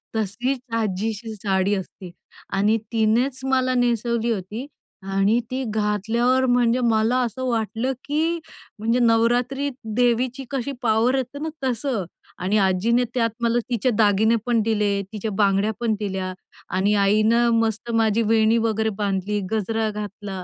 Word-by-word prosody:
तशीच 220 +5 -1 0.2
आजीची 215 +3 -3
साडी 195 0 0
असते. 185 -1 -7 0.4
आणि 205 +3 +3
तिनेच 235 +4 +1
मला 260 -1 +1
नेसवली 235 -1 +1
होती. 210 +5 -4 0.5
आणि 195 +4 +3
ती 260 +1 -2
घातल्यावर 225 +5 +1
म्हणजे 245 -1 +3
मला 225 +3 +2
असं 250 +2 -3
वाटलं 230 +2 -1
की 315 +4 0 0.4
म्हणजे 230 +3 +1
नवरात्री 240 +4 +2 0.3
देवीची 245 +2 +1
कशी 270 0 -2
पॉवर 230 +3 +2
येते 265 +2 -3
ना, 315 +2 -3
तसं 245 -5 -1 0.3
आणि 190 +4 0
आजीने 205 +5 +2
त्यात 230 -3 +1
मला 235 +1 +2
तिचे 245 +1 +1
दागिने 215 +1 +4
पण 235 -2 +2
दिले, 210 -2 +1
तिच्या 215 0 -3
बांगड्या 200 +1 +2
पण 230 -2 +1
दिल्या. 190 -3 -3 0.4
आणि 195 +3 +1
आईनं 215 +4 +3
मस्त 225 +1 -1
माझी 225 -1 +2
वेणी 220 +1 +4
वगैरे 220 -1 +1
बांधली, 200 +1 -1
गजरा 220 +1 0
घातला. 205 -2 -6
225 Hz, 135 wpm, -23 LUFS, 210-245 Hz, 0.5 s, दागिने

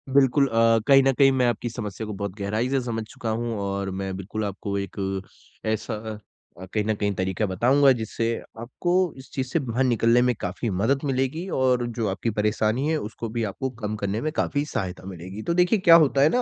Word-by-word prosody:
बिल्कुल 140 0 +5
अ, 115 -1 +4
कहीं 135 -1 +7
न 135 - +4
कहीं 135 +1 +5
मैं 125 - +4
आपकी 120 0 -1
समस्या 110 -2 -5
को 105 - -4
बहुत 100 -2 -4
गहराई 105 +5 -1
से 135 0 +2
समझ 115 -2 -3
चुका 115 - -5
हूँ 115 +1 -1
और 100 0 -2
मैं 95 -1 -3
बिल्कुल 105 +3 -4
आपको 100 0 -3
एक 100 - -6 0.8
ऐसा 110 - -2 0.7
अ, 95 - -7
कहीं 105 - +1
न 110 - +1
कहीं 100 0 -1
तरीका 95 +3 -1
बताऊँगा 130 +9 +4
जिससे 115 -1 -1 0.3
आपको 130 +9 -2 0.2
इस 130 - -12
चीज़ 130 -1 -2
से 165 - 0
बाहर 130 -2 -1
निकलने 120 -1 +3
में - - +3
काफ़ी 90 +6 -3
मदद 110 +9 +1
मिलेगी 135 +6 -1
और 125 -2 +2
जो 115 -2 -2
आपकी 95 +4 -2
परेशानी 110 +5 +1
है, 160 - +2
उसको 115 -3 -5
भी 115 +1 -2
आपको 130 +7 -3
कम 105 0 -1
करने 105 +1 -2
में 155 - -1
काफ़ी 145 -2 0
सहायता 95 -10 -4
मिलेगी। 95 +3 -8
तो 170 - 0
देखिए 180 +4 +3
क्या 170 -3 +7
होता 135 0 +1
है 145 - +6
ना, 250 - +2
115 Hz, 210 wpm, -25 LUFS, 105-135 Hz, 0.8 s, कहीं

